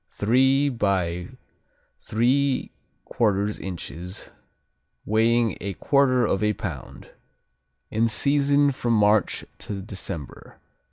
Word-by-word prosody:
Three 130 Hz, +6 st, +3 dB
by 95 Hz, -7 st, -1 dB, 0.7 s
3/4 130 Hz, +4 st, +1 dB, 0.9 s
inches, 90 Hz, 0 st, -7 dB, 0.8 s
weighing 115 Hz, 0 st, +2 dB
a 100 Hz, 0 st, -3 dB
quarter 130 Hz, -, +2 dB
of 95 Hz, -, 0 dB
a 105 Hz, 0 st, +2 dB
pound. 80 Hz, -11 st, -7 dB, 0.8 s
In 115 Hz, +1 st, +2 dB
season 140 Hz, +3 st, +2 dB
from 120 Hz, -3 st, -1 dB
March 105 Hz, -1 st, +2 dB
to 100 Hz, -2 st, -6 dB
December. 95 Hz, -7 st, -8 dB
110 Hz, 90 wpm, -24 LUFS, 100-130 Hz, 0.9 s, Three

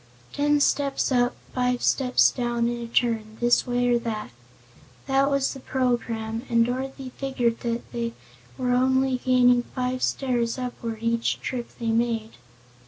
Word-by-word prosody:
Ten 295 Hz, 0 st, +2 dB
steps 280 Hz, -1 st, +1 dB
up, 245 Hz, -1 st, +2 dB, 0.2 s
five 250 Hz, -1 st, 0 dB
steps 255 Hz, -2 st, +4 dB
down, 240 Hz, -2 st, -1 dB
and 240 Hz, 0 st, -3 dB
a 235 Hz, -, -5 dB
turn, 220 Hz, -3 st, 0 dB
this 240 Hz, +2 st, +3 dB
way 245 Hz, 0 st, +1 dB
or 240 Hz, -1 st, +3 dB
that. 220 Hz, -, -4 dB, 0.7 s
That 275 Hz, +1 st, +2 dB
was 275 Hz, -1 st, +1 dB
the 270 Hz, -, -9 dB
program, 230 Hz, -4 st, -1 dB
and 230 Hz, -1 st, +4 dB
Dorothy 260 Hz, +1 st, -4 dB
figured 245 Hz, -4 st, 0 dB
that 235 Hz, 0 st, -2 dB
they 235 Hz, -1 st, -3 dB, 0.4 s
were 250 Hz, -1 st, 0 dB
only 260 Hz, +1 st, +2 dB
gaining 250 Hz, -1 st, +4 dB
five 255 Hz, +1 st, -3 dB
stairs 240 Hz, -3 st, 0 dB
upward 235 Hz, -3 st, -5 dB
each 230 Hz, 0 st, 0 dB
trip 245 Hz, -2 st, -4 dB
that -, -, -25 dB
they 230 Hz, -1 st, -1 dB
made. 225 Hz, -1 st, 0 dB
245 Hz, 155 wpm, -25 LUFS, 235-255 Hz, 0.7 s, steps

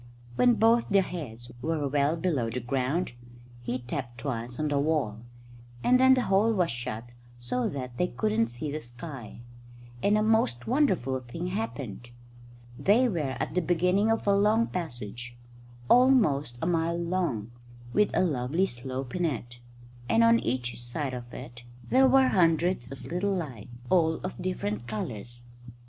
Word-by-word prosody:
When 245 Hz, -, +5 dB
both 230 Hz, +1 st, +3 dB
their 200 Hz, -2 st, +4 dB
heads 125 Hz, -10 st, -7 dB
were 155 Hz, 0 st, -1 dB
well 145 Hz, +3 st, +2 dB
below 155 Hz, -10 st, 0 dB
the 120 Hz, +3 st, -3 dB
ground, 130 Hz, +7 st, -1 dB, 0.5 s
he 120 Hz, +1 st, -2 dB
tapped 125 Hz, -1 st, -6 dB
twice 125 Hz, -3 st, -4 dB
on 155 Hz, -1 st, 0 dB
the 145 Hz, -1 st, +1 dB
wall; 140 Hz, -8 st, 0 dB, 0.6 s
and 255 Hz, +1 st, +5 dB
then 260 Hz, 0 st, +7 dB
the 255 Hz, -, +1 dB
hole 200 Hz, +4 st, +3 dB
was 180 Hz, -5 st, +1 dB
shut 120 Hz, -1 st, -5 dB, 0.3 s
so 120 Hz, +1 st, -2 dB
that 125 Hz, -3 st, -6 dB
they 180 Hz, -, +2 dB
couldn't 110 Hz, -4 st, 0 dB
see 120 Hz, +6 st, -5 dB
the 155 Hz, -, -3 dB
sky, 120 Hz, -3 st, -9 dB, 0.6 s
and 205 Hz, +1 st, +3 dB
a 215 Hz, -, +2 dB
most 215 Hz, -, +2 dB
wonderful 190 Hz, -, +1 dB
thing 130 Hz, +9 st, -5 dB
happened. 140 Hz, -, -5 dB, 0.7 s
They 230 Hz, +6 st, +4 dB
were 155 Hz, -, -2 dB
at -, -, -2 dB
the 180 Hz, -, +2 dB
beginning 180 Hz, +5 st, +2 dB
of 225 Hz, -, +1 dB
a 200 Hz, -1 st, +4 dB
long 215 Hz, +3 st, +3 dB
passage, 120 Hz, -, -6 dB, 0.5 s
almost 180 Hz, -, +4 dB
a -, -, +1 dB
mile 170 Hz, 0 st, +1 dB
long, 170 Hz, -, -2 dB, 0.4 s
with 210 Hz, -, +4 dB
a -, -, +3 dB
lovely 145 Hz, +4 st, +1 dB
slope 130 Hz, -1 st, -6 dB
in 180 Hz, -, -1 dB
it; 120 Hz, -6 st, -3 dB, 0.5 s
and 230 Hz, -, +4 dB
on 230 Hz, 0 st, +6 dB
each 120 Hz, 0 st, -3 dB
side 130 Hz, +3 st, -4 dB
of 120 Hz, -1 st, -7 dB
it 120 Hz, -1 st, -9 dB, 0.3 s
there 265 Hz, +1 st, +6 dB
were 265 Hz, 0 st, +5 dB
hundreds 165 Hz, -6 st, +2 dB
of 135 Hz, -, -9 dB
little 195 Hz, +3 st, -1 dB
lights, 130 Hz, -, -5 dB, 0.2 s
all 165 Hz, -3 st, +4 dB
of 185 Hz, -, -6 dB
different 120 Hz, -, -3 dB
colours. 120 Hz, +1 st, -6 dB
150 Hz, 160 wpm, -28 LUFS, 120-185 Hz, 0.7 s, then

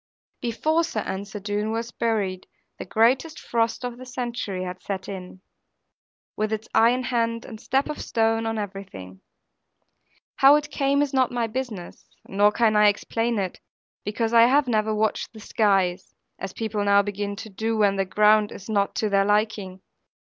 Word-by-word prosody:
Before 310 Hz, +8 st, +1 dB
Sir 330 Hz, -, -2 dB
Ensor 200 Hz, +2 st, -5 dB
Doone 205 Hz, +1 st, -2 dB
was 230 Hz, +1 st, -3 dB
buried, 205 Hz, -6 st, -1 dB, 0.3 s
the -, -, -5 dB
greatest 255 Hz, -, +2 dB
frost 230 Hz, +1 st, -1 dB
of 245 Hz, 0 st, -6 dB
the 255 Hz, -, -9 dB
century 240 Hz, -7 st, -4 dB
had 180 Hz, 0 st, -6 dB
set 195 Hz, -1 st, -5 dB
in, 185 Hz, -1 st, -8 dB, 0.9 s
with 215 Hz, 0 st, -1 dB
its 220 Hz, 0 st, -3 dB
iron 245 Hz, +3 st, +4 dB
hand, 230 Hz, -2 st, -1 dB
and 220 Hz, -1 st, -10 dB
step 270 Hz, +1 st, 0 dB
of 300 Hz, -, -5 dB
stone, 225 Hz, 0 st, +1 dB
on 225 Hz, 0 st, -2 dB
everything. 190 Hz, -, -7 dB, 1.2 s
How 275 Hz, +2 st, +7 dB
it 295 Hz, -1 st, -1 dB
came 280 Hz, +1 st, +2 dB
is 285 Hz, -1 st, -4 dB
not 260 Hz, -2 st, +2 dB
my 240 Hz, -1 st, 0 dB
business, 225 Hz, -6 st, -6 dB, 0.2 s
nor 205 Hz, +2 st, +3 dB
can 220 Hz, 0 st, +2 dB
I 210 Hz, 0 st, +6 dB
explain 225 Hz, +3 st, 0 dB
it; 190 Hz, -3 st, -3 dB, 0.4 s
because 225 Hz, +2 st, -2 dB
I 230 Hz, 0 st, +7 dB, 0.2 s
never 220 Hz, -3 st, +1 dB
have 215 Hz, -, 0 dB
watched 215 Hz, +2 st, -1 dB
the 220 Hz, -, -11 dB
skies; 195 Hz, -4 st, 0 dB, 0.2 s
as 195 Hz, -, -5 dB
people 215 Hz, -2 st, -2 dB
now 200 Hz, 0 st, +4 dB
begin 205 Hz, 0 st, -4 dB
to 220 Hz, +1 st, -8 dB
do, 220 Hz, +3 st, -2 dB
when 205 Hz, -2 st, +3 dB
the 195 Hz, -, +1 dB
ground 210 Hz, +2 st, +4 dB
is 195 Hz, -, -10 dB
not 200 Hz, -2 st, 0 dB
to 215 Hz, -, 0 dB
their 195 Hz, 0 st, +3 dB
liking. 205 Hz, -2 st, 0 dB
215 Hz, 170 wpm, -24 LUFS, 200-235 Hz, 1.2 s, How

